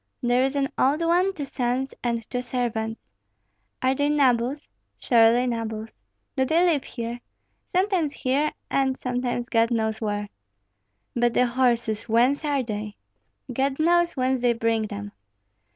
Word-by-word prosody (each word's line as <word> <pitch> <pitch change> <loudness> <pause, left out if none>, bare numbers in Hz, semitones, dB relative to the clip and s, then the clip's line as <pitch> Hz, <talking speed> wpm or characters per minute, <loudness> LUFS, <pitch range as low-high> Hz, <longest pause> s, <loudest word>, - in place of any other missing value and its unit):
"There 245 +1 +3
is 270 +1 0
an 275 -1 +1
old 285 +5 +3
one, 355 +3 +3
two 300 -7 -5
sons, 255 0 -2
and 235 -2 -2
two 250 - -3
servants." 230 -3 -3 0.8
"Are 260 +1 +3
they 285 +2 0
nobles?" 265 -1 +1 0.3
"Surely 235 0 +4
nobles." 225 -2 -4 0.4
"Do 265 - +2
they 325 +6 +3
live 315 -6 +2
here?" 235 0 -5 0.6
"Sometimes 370 -5 +2
here, 285 +3 0 0.2
and 265 -1 +1
sometimes 245 -1 -2
God 230 0 +3
knows 220 -2 -1
where." 205 -1 -2 0.9
"But 240 -1 +1
the 250 - +4
horses, 235 -3 0
whence 245 +7 +3
are 285 -3 0
they?" 210 -2 -5 0.6
"God 270 +2 0
knows 345 +2 +3
whence 260 0 +1
they 245 -1 +3
bring 225 -1 0
them." 100 - -7
250 Hz, 145 wpm, -25 LUFS, 230-275 Hz, 0.9 s, Surely